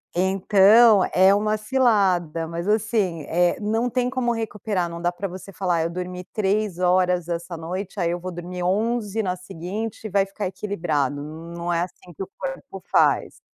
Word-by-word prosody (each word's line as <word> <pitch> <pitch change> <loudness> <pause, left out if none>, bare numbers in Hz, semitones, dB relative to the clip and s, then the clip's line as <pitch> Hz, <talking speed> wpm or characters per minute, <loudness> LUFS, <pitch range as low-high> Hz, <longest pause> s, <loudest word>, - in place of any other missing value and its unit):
Então 195 +3 +5
é 190 +1 +6
uma 215 +1 +1
cilada, 200 -9 +1
mas 170 +2 -5
assim, 210 -6 0
eh, 175 +1 +2
não 225 +4 0
tem 250 +1 0
como 255 -2 0
recuperar. 210 -5 -2
Não 170 0 -7
dá 175 0 +1
para 200 +3 -4
você 190 +2 -9
falar: 175 -3 0
"Eu 165 - -1
dormi 180 +1 -5
3 205 -2 0
horas 180 -1 +2
essa 170 0 -4
noite, 185 +5 -5
aí 170 -1 +1
eu 175 - -2
vou 185 +1 -6
dormir 175 +1 -6
11 215 +3 0
na 185 -3 -1
seguinte 185 +6 -6
e - - -3
vai 195 0 +2
ficar 195 0 -4
equilibrado.". 165 -8 -2
Não 170 +3 -6
é 170 - +1
assim 175 0 -7
que 195 - -4
o 185 - -10
corpo 180 +1 -6
faz. - - +2
185 Hz, 175 wpm, -23 LUFS, 175-210 Hz, -, é